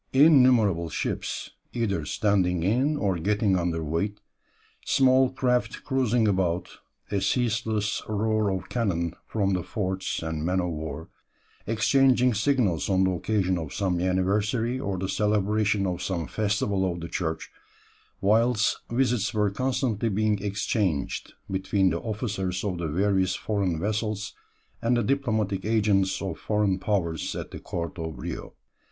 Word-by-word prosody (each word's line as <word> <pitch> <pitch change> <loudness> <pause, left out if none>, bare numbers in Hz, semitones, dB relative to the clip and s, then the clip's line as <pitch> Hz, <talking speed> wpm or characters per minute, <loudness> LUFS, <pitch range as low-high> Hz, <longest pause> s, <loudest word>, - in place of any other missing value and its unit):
Innumerable 125 - +5
ships, - - -3 0.2
either 100 -10 -1
standing 90 -5 +1
in 130 - +2
or 95 -8 0
getting 100 +2 +2
under 85 -2 -1
weigh, 85 +7 -1 0.7
small 130 -1 +4
craft 125 -3 0
cruising 125 -4 +1
about, 90 -3 -1 0.3
a 100 - 0
ceaseless 110 0 0
roar 110 0 +1
of 95 -1 -3
cannon 85 -8 -1
from 100 -3 0
the 90 - 0
forts 95 -1 -3
and 80 -1 -3
men 90 +3 +1
of 90 -1 -1
war, 80 0 -6 0.6
exchanging 125 +3 +3
signals 110 - +1
on 95 -1 +3
the 95 - +2
occasion 95 -1 0
of 80 -3 -6
some 95 -3 0
anniversary 105 +7 0
or 100 -6 -2
the 95 +1 -2
celebration 105 0 +1
of 90 -2 -2
some 85 -4 -2
festival 100 -2 0
of 85 - -5
the 85 - -5
church, 80 -2 -3 0.7
whilst 110 +2 +3
visits 120 -4 +1
were 105 -2 +2
constantly 120 -1 0
being 105 0 +1
exchanged 100 - -1
between 95 0 +1
the 85 - -1
officers 100 -5 -3
of 95 -4 -2
the 85 - -2
various 95 +3 +1
foreign 100 -6 -1
vessels 105 +2 -2 0.5
and 120 +1 +2
the 120 - +1
diplomatic 110 -8 0
agents 105 -3 +1
of 95 -4 -4
foreign 105 -3 +1
powers 85 -6 -1
at - - -6
the - - -7
court 85 +1 -5
of 80 -1 -5
Rio." - - -6
100 Hz, 140 wpm, -26 LUFS, 90-110 Hz, 0.7 s, Innumerable